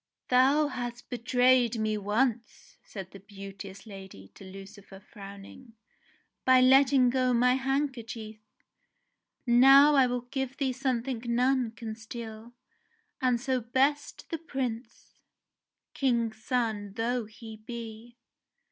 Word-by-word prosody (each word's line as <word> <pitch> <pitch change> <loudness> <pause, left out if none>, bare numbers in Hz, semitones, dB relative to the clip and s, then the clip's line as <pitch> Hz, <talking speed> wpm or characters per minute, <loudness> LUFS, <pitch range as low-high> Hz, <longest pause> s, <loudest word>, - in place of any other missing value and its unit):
"Thou 275 +4 +4
hast 240 -2 -6
betrayed 245 -1 +2
me 215 -1 -1
once," 220 +3 -2
said 190 -3 -9
the 195 - -12
beauteous 195 0 -11
lady 190 - -11
to - - -16
Lucifer, 195 +1 -12
frowning, 200 +4 -13 0.7
"by 260 0 +5
letting 260 0 +5
go 255 -1 +1
my 250 +1 +4
handkerchief. 260 -5 -3 1.1
Now 270 +4 +7 0.2
will 245 0 -2
I - - -33
give 265 -1 -3
thee 265 -3 -1
something 255 -2 -2
none 250 +1 +1
can 225 -1 -7
steal, 225 +1 -9 0.7
and 250 -2 +2
so 260 0 -1
best 270 +5 -1
the 330 - -3
Prince, 255 -6 -6 0.7
King's 235 -4 -1
son 220 -6 -2
though 235 +2 -2
he 220 +1 -11
be." 230 +1 -9
240 Hz, 115 wpm, -28 LUFS, 215-255 Hz, 1.1 s, Now